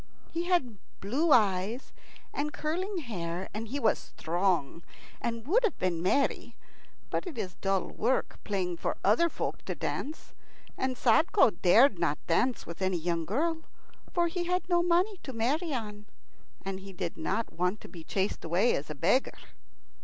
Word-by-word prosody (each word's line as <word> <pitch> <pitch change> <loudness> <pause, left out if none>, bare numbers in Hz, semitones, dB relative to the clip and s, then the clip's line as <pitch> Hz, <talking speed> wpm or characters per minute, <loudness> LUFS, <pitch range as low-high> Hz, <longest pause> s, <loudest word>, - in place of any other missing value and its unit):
He 340 +1 -2
had 270 - +1 0.2
blue 280 - +1
eyes 210 +1 +2 0.4
and 295 +1 -1
curling 365 +7 -2
hair, 180 -5 -4
and 220 +2 -4
he 275 +6 -3
was 225 -5 +3
strong, 170 -3 -1 0.4
and 230 -1 -3
would 430 - +3
have 455 - +1
been 175 -3 0
merry; 270 +10 +1 0.6
but - - -1
it 320 -8 -7
is 185 -4 -3
dull 195 -2 +1
work 250 +4 0
playing 185 -4 -1
for - - -2
other 230 - +4
folk - - -4
to - - -3
dance, 305 +3 -4 0.4
and 260 -1 -1
Sadko 310 - +5
dared 210 +2 +6
not 160 -4 +1
dance 245 +9 +1
with 170 +2 -8
any 185 -1 +1
young 170 0 -1
girl, 320 - 0 0.5
for 345 -1 +2
he 345 +1 -2
had 360 +1 0
no 350 -1 +3
money 355 +4 +2
to 265 - -7
marry 285 +9 0
on, 210 -5 -4 0.6
and 195 -1 -3
he 195 0 -10
did 180 -2 -4
not 205 +8 -2
want 180 +4 0
to - - -10
be 170 -3 -10
chased 195 +4 -1
away 180 +9 +3
as 145 - -4
a 150 - -4
beggar. 195 - +2
225 Hz, 170 wpm, -30 LUFS, 185-305 Hz, 0.6 s, dared